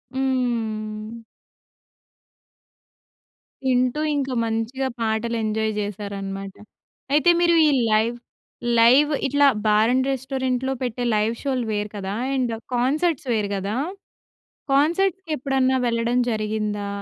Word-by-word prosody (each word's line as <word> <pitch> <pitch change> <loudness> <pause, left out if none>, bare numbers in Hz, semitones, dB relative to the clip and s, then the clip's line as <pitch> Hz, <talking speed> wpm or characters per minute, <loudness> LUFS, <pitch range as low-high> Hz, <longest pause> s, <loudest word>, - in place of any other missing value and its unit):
హ్మ్. 225 -4 -2 2.5
వింటూ 255 +3 +2
ఇంకా 270 -2 -1
మంచిగా 230 +4 -2
పాటలు 225 +1 -1
ఎంజాయ్ 220 0 0
చేశారన్నమాట. 195 -1 -5 0.6
అయితే 300 +3 +4
మీరు 340 -1 +4
ఈ - - +5 0.2
లైవ్, 220 +2 +2 0.6
లైవ్ 265 +6 +6 0.2
ఇట్లా 285 +1 +4 0.2
బార్ 215 +2 +4
అండ్ 260 +1 +1
రెస్టారెంట్‌లో 265 0 -2
పెట్టే 245 0 -3
లైవ్ 215 +2 +1
షోలు 260 -4 -1
వేరు 210 0 -2
కదా! 195 0 -4 0.2
అండ్ 250 -3 0 0.2
కాన్సర్ట్స్ 280 +4 0
వేరు 210 -2 0
కదా! 200 +3 -3 1.0
కాన్సర్ట్స్‌కి 345 +5 +1
ఎప్పుడన్నా 265 0 +1
వెళ్ళడం 230 +1 0
జరిగిందా? 215 -1 -2
240 Hz, 100 wpm, -23 LUFS, 215-265 Hz, 2.5 s, లైవ్